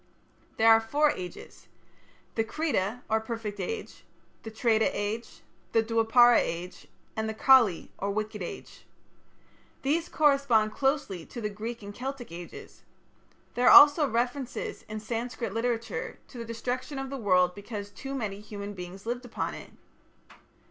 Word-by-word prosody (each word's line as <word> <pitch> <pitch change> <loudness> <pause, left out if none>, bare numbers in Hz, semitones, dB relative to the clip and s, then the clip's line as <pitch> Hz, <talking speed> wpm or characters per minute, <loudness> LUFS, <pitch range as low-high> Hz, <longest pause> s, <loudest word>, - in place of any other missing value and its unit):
There 225 +1 +6
are 225 0 +7
four 290 +7 +2
ages: 180 -7 -9 0.7
the 225 - +1
Krita 245 - -2
or 220 0 +2
Perfect 220 -2 -5
Age, 450 -2 -5 0.4
the 220 - -7
Treta 220 0 +2
Age, 210 +3 -4 0.3
the 225 - +4
Dwapara 230 +2 +5
Age, 175 +2 -4 0.3
and 220 0 -2
the 220 - -4
Kali 230 -7 +4
or 200 - -2
Wicked 215 0 -3
Age. 175 - -8 1.0
These 320 +5 0
correspond 275 -8 +3
closely 270 - -1
to 240 - -8
the 210 -2 -2
Greek 225 +2 -6
and 200 0 -8
Celtic 255 -2 -6
ages. 170 0 -10 0.7
There 245 +1 +2
are - - +11
also 290 0 +7
references 245 +3 -3
in 215 0 -4
Sanskrit 230 0 -4
literature 240 - -2
to 245 - -10
the 230 - -5
destruction 250 +4 -4
of 270 0 -5
the 275 - -3
world 180 -5 +3
because 205 0 -7
too 270 +7 -6
many 210 -6 -3
human 205 -1 -7
beings 185 +1 -9
lived 245 +2 -3
upon 245 -1 -4
it. - - -9
225 Hz, 150 wpm, -28 LUFS, 205-255 Hz, 1.0 s, are